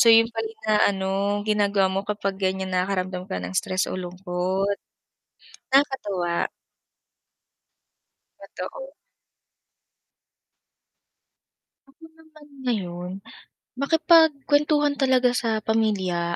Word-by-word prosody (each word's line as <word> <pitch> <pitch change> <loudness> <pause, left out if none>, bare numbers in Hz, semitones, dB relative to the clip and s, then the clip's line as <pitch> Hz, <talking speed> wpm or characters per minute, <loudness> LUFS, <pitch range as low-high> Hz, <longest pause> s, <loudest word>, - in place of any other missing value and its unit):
So 235 - +6
yun 225 0 +7
pala 225 -1 -3
yung 220 0 -16
inaano, 205 -3 +2 0.4
ginagawa 205 -2 +2
mo 190 - 0
kapag 200 -2 -2
ganyan 190 0 -1
nakakaramdam 185 0 -1
ka - - -3
ng 90 +1 -6
stress 185 - 0
o - - -4
lungkot. 185 +2 -2 0.9
Nakakatuwa. 205 -11 +1 1.9
Totoo. - - -8 2.9
Kasi 275 +4 -23 0.2
naman 310 -2 -18 0.2
ngayon, 180 -6 -2 0.7
makipag-kwentuhan 295 -1 +3
talaga 255 -2 +3
sa 225 -3 -1
pamilya 190 -6 0
210 Hz, 90 wpm, -24 LUFS, 185-270 Hz, 2.9 s, yun